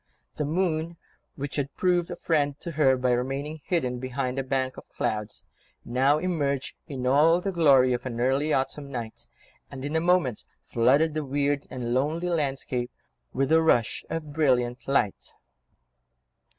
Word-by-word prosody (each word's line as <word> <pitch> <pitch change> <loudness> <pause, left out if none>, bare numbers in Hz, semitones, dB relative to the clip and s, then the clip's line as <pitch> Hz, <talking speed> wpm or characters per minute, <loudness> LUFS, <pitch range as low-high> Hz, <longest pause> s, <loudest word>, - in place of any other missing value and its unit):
The 150 - -1
moon, 165 0 -1 0.4
which 140 +1 -5
had 140 -1 -2
proved 180 -2 +1
a - - -4
friend 145 -3 0
to 170 - -5
her 140 -4 +3
by 125 0 +1
remaining 135 +5 -2
hidden 125 -9 -1
behind 130 +1 -3
a - - -1
bank 130 0 -1
of - - -12
clouds, 105 -1 -3 0.4
now 130 +5 +3
emerged 150 -6 -1
in 130 -3 -5
all 150 +6 +5
the 195 +2 -2
glory 140 -7 +5
of 120 0 -2
an 120 -2 -5
early 135 +5 +1
autumn 140 +1 -1
night, 115 -4 -6 0.4
and 135 -1 -7
in 145 +2 -3
a 160 - +2
moment 170 -9 +2 0.2
flooded 140 +7 +3
the 155 -1 -2
weird 145 +1 -1
and 120 -2 -3
lonely 155 +7 0
landscape 135 -6 -1 0.4
with 135 +2 0
a 160 0 +6
rush 120 -8 +2
of 155 -3 -4
brilliant 125 -5 +1
light. 135 -8 0
140 Hz, 160 wpm, -26 LUFS, 130-155 Hz, 0.4 s, a